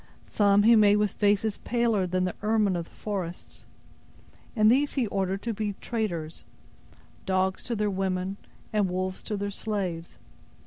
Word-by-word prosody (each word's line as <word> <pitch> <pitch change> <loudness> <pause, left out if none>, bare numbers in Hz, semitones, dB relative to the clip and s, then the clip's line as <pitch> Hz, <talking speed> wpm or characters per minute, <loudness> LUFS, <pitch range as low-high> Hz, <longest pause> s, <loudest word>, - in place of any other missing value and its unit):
Some 205 -1 +3
He 230 +2 +7
made 205 -2 +6
with 210 -1 +1
faces 205 0 +1
paler 230 -5 +1
than 185 +1 0
the 180 - -1
ermine 210 -2 +2
of 170 -1 -3
the - - -22
forests; 190 -5 -6 0.9
and 215 -1 +5
these 280 +3 +2
He 260 -4 +1
ordered 195 -1 -2
to 235 - -2
be 210 -1 -2
traders; 175 -9 -3 0.8
dogs 190 0 0
to 240 - -2
their 210 -1 0
women, 190 0 -2 0.4
and 205 -3 +2
wolves 185 +1 -3
to 210 - -4
their 200 0 -3
slaves. 190 -6 -4
200 Hz, 160 wpm, -27 LUFS, 185-215 Hz, 0.9 s, He